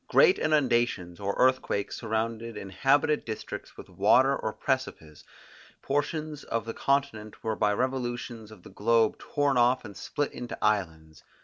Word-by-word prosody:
Great 435 -6 +5
inundations 120 - +1
or 100 0 -2
earthquakes 130 -6 +1
surrounded 115 0 -3
inhabited 135 +10 +1
districts 110 -2 -7
with - - -10
water - - +4
or - - -3
precipices, 75 -2 -3 0.6
portions 150 +1 -2
of 115 -1 -3
the 115 - -4
continent 140 -7 -1
were 110 -1 -1
by 105 - +2
revolutions 120 -1 -3
of 105 -5 -14
the - - -13
globe 110 +2 +2
torn 140 -3 0
off 120 +1 +3
and 100 -2 -9
split 145 - -3
into 120 0 -7
islands. 80 -7 -1
115 Hz, 140 wpm, -28 LUFS, 105-135 Hz, 0.6 s, Great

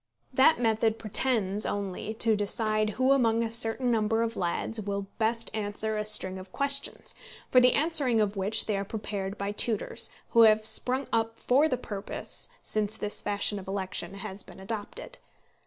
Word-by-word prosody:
That 265 +2 +4
method 225 -1 +1
pretends 215 -2 0
only 200 +2 -3
to 225 0 +4
decide 215 +1 0
who 260 +1 +3
among 230 -4 +3
a 225 - -3
certain 230 +2 +1
number 225 0 +1
of 230 0 -3
lads 190 +5 0
will 200 -1 -4
best 230 +1 0
answer 215 +1 0
a 210 - -1
string 190 -3 0
of 185 0 -12
questions, 280 +3 -3 0.4
for 255 - +6
the 250 0 +5
answering 290 -7 +5
of 210 -1 0
which 205 +3 +2
they 210 -2 -1
are 195 - -2
prepared 200 -1 -5
by 200 +1 -3
tutors, 210 +1 0 0.2
who 230 - +4
have 215 -1 +5
sprung 255 +5 0
up 225 0 0
for 275 +5 +3
the 255 - 0
purpose 205 - -5
since 215 0 -2
this 210 -1 -2
fashion 205 0 0
of 190 - -12
election 190 -1 -4
has 200 0 -6
been - - -12
adopted. 205 +1 -7
215 Hz, 170 wpm, -28 LUFS, 205-230 Hz, 0.4 s, for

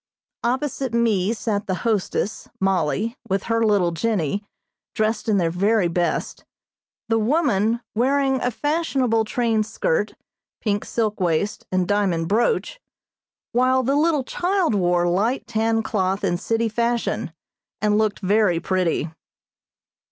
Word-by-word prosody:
Opposite 260 0 -1
me 220 -4 +2
sat 215 -3 -2
the 185 - 0
hostess 210 -1 -1
(Mollie) 195 +4 0
with 195 0 0
her 230 0 +1
little 200 -5 +3
Jennie, 200 0 -1 0.5
dressed 220 +1 0
in 210 - +3
their 170 -3 +1
very 200 +2 +2
best, 175 0 -2 0.6
the 225 -1 +2
woman 235 - +1
wearing 265 +3 +1
a 245 - +1
fashionable 265 -5 0
trained 225 -1 0
skirt, 485 - -1 0.4
pink 205 -2 -1
silk 215 -3 -1
waist 180 +3 -1
and 185 -1 +1
diamond 185 -5 +1
brooch, 240 - +1 0.7
while 255 +1 +3
the 270 +3 +1
little 300 -2 +2
child 360 - 0
wore 175 -3 +2
light 215 +8 0
tan 225 0 0
cloth 195 -2 -1
in 175 - +1
city 225 +4 0
fashion, 235 -4 -1 0.5
and 210 0 +2
looked 215 -1 0
very 195 -3 +2
pretty. 180 -3 0
220 Hz, 130 wpm, -22 LUFS, 195-240 Hz, 0.7 s, little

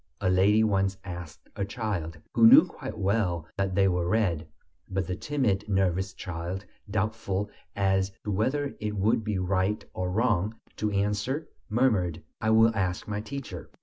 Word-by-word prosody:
a 95 -2 +1
lady 100 +4 +4
once 95 -2 +1
asked 85 -4 -8
a 100 - -1
child, 100 -6 -3 0.2
who 230 - +7
knew 270 +7 +9
quite 110 - -8
well 95 -5 0
that 95 -1 -1
they 95 0 +4
were 90 -2 +1
red. 90 -7 +1 0.4
But 95 -1 -1
the 90 +1 -3
timid, 105 -5 -1
nervous 95 -1 +1
child, 90 +3 -5 0.2
doubtful 105 -1 -1 0.2
as 95 -1 +2
to 105 - -2
whether 135 +8 0
it 105 0 -3
would 110 +3 +2
be 105 -2 -1
right 95 +3 0
or 90 0 -2
wrong 105 0 +1 0.2
to 105 - 0
answer, 105 +9 -1 0.2
murmured: 105 -9 +1 0.2
"I 110 - +1
will 110 +1 +5
ask 90 -3 -1
my 105 0 -2
teacher." 115 -7 -7
100 Hz, 160 wpm, -28 LUFS, 95-110 Hz, 0.4 s, knew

